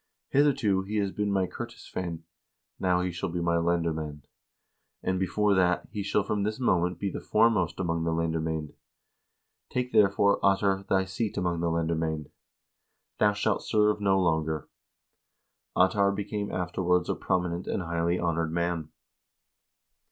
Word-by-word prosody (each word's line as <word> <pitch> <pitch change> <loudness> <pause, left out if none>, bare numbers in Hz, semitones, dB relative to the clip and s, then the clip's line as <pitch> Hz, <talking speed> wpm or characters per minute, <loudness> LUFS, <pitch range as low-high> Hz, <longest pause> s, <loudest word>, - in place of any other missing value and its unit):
Hitherto 135 -9 +3
he 100 +3 -5
has 100 -2 +1
been 105 0 -1
my 95 -1 +2
ker - - -6
tisveinn; 85 -3 -6 0.6
now 90 -1 +2
he 90 0 -1
shall 85 +1 -3
be 85 +1 -3
my 85 0 +1
lendermand, 80 -3 -1 0.8
and, 95 0 0 0.2
more 105 -1 +4
than 95 -1 +4
that, 90 0 0
he 105 -1 -3
shall 100 +1 +1
from 105 0 -1
this 105 +4 -2
moment 90 -7 +1
be 100 +1 -2
the - - -5
foremost 105 -7 +2
among 85 -3 -1
the 80 - 0
lendermcend. 80 -2 -2 1.0
Take, 125 0 -2
therefore, 100 0 +4
Ottar, 95 0 +2
thy 95 0 +2
seat 100 +3 -3
among 90 -3 0
the 85 0 0
lendermcend. 80 -2 -1 0.9
Thou 105 -1 +4
shalt 105 0 0
serve 105 -1 +2
no 95 -1 +3
longer." 80 -3 0 1.1
Ottar 100 +2 +4
became 105 0 -3
afterwards 90 0 0
a - - +1
prominent 90 -1 -1
and 90 - -1
highly 85 +1 0
honored 85 -2 0
man. 85 -2 -1
90 Hz, 150 wpm, -28 LUFS, 85-100 Hz, 1.1 s, more